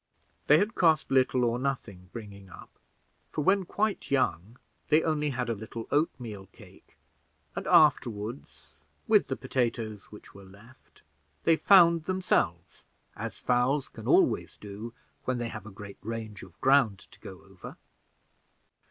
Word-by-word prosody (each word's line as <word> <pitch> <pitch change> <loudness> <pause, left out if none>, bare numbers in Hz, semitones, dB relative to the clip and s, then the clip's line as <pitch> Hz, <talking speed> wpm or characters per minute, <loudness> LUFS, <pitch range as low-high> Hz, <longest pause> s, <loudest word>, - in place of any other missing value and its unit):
They 150 - +7
had 205 +6 0
cost 160 -9 +2
little 130 -1 +3
or 120 0 0
nothing 110 -9 -4
bringing 100 -4 -10
up; - - -13 0.6
for 150 - -2
when 190 +3 +3
quite 210 +3 -2
young, 115 - -1 0.3
they 155 +1 +4
only 150 -2 0
had 125 -2 -3
a 115 - 0
little 110 +1 -7
oatmeal 115 -10 -2
cake, - - -19 0.6
and - - -5
afterward, 120 -5 +3 0.7
with - - +4
the - - -2
potatoes 115 -4 -3
which 105 - -15
were 100 - -13
left, 100 +7 -19 0.4
they 165 - +4
found 170 -3 +5
themselves, 185 +1 -1 0.3
as 110 -1 -6
fowls 125 +3 +1
can - - -10
always - - +2
do 105 +3 -8 0.3
when 130 -1 -1
they 120 -1 -3
have 110 -2 -8
a - - -9
great 100 0 -11
range 110 -2 -6
of 85 -3 -15
ground 135 -7 +4
to - - -18
go - - -11
over. - - -12
120 Hz, 145 wpm, -28 LUFS, 105-150 Hz, 0.7 s, They